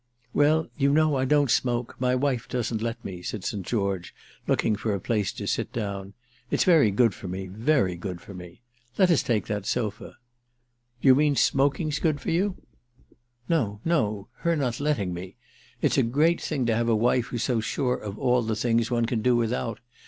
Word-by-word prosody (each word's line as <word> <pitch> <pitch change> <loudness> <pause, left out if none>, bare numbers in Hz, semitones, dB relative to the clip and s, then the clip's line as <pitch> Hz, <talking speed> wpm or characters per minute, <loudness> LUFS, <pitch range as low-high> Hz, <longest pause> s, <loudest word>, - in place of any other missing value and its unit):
"Well, 155 +2 +3
you 140 0 +3
know, 155 0 +3
I 130 0 +1
don't 145 -2 +3
smoke—my 125 +1 0
wife 130 -2 0
doesn't 120 -3 -2
let 115 +1 -4
me," 90 -2 -6
said 95 +2 -5
St. 100 -1 -3
George, 100 -3 -2 0.3
looking 110 - +2
for 105 0 -2
a - - -3
place 105 -1 -1
to - - -6
sit - - -1
down. 100 -3 -4 0.4
"It's - - +2
very 160 - +5
good 105 +2 +3
for 100 +1 -9
me—very 95 - 0
good 90 0 -5
for 100 - -12
me. 90 +4 -11 0.3
Let 185 -2 +5
us 165 - +4
take 115 -4 0
that 105 -2 -3
sofa." 110 -4 -3 0.9
"Do - - +2
you 130 - +9
mean 145 +1 +3
smoking's 140 +3 +1
good 155 -4 +1
for - - -3
you?" 185 +3 -1 0.8
"No 115 -12 0
no—her 145 - 0
not 125 -6 -1
letting 140 -11 0
me. 90 +3 -7 0.5
It's - - +3
a - - +5
great 150 +8 +2
thing 140 -5 -1
to 115 -1 +2
have 115 +1 0
a 115 - +4
wife 120 +2 +2
who's 120 -2 -3
so 125 -4 +1
sure 125 +3 -1
of 105 -1 -7
all 125 -2 +2
the 110 -1 -1
things 115 +1 +1
one 120 -2 +1
can 115 -1 -1
do 125 +1 +3
without. 115 -1 -1
120 Hz, 190 wpm, -26 LUFS, 105-140 Hz, 0.9 s, you